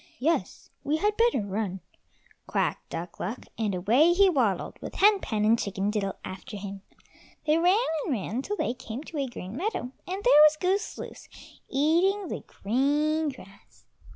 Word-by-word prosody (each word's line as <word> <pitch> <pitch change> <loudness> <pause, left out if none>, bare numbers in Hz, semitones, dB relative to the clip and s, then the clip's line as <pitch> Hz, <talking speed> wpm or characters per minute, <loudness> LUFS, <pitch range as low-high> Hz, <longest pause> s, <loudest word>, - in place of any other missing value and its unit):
"Yes, 320 +6 -1
we 300 +2 +1
had 420 +5 +1
better 465 - +3
run," 200 -1 -3 0.7
quacked - - -1
Duck 170 +2 -6
luck, 215 +7 -4
and 210 -4 -1
away 240 - +4
he 390 +1 +5
waddled 230 - 0
with - - -7
Hen 410 0 +5
pen, 215 - -1
and 225 +2 +4
Chicken 200 +1 -1
diddle 200 -2 -2
after 190 +3 -7
him. 200 0 -7 0.6
They 310 +1 +3
ran 360 +4 +4 0.3
and - - -2
ran 225 +2 -2
till 415 +9 -3
they 240 - 0
came 250 0 -7
to 315 -2 -6
a 275 - 0
green 200 -4 -8
meadow, 340 - -2 0.2
and 380 +3 -4
there - - +7
was 305 0 0
Goose 380 +3 0
loose - - -9 0.4
eating 345 +7 +2
the - - -5
green 295 +8 +1
grass. 200 -7 -14
265 Hz, 170 wpm, -27 LUFS, 205-340 Hz, 0.7 s, there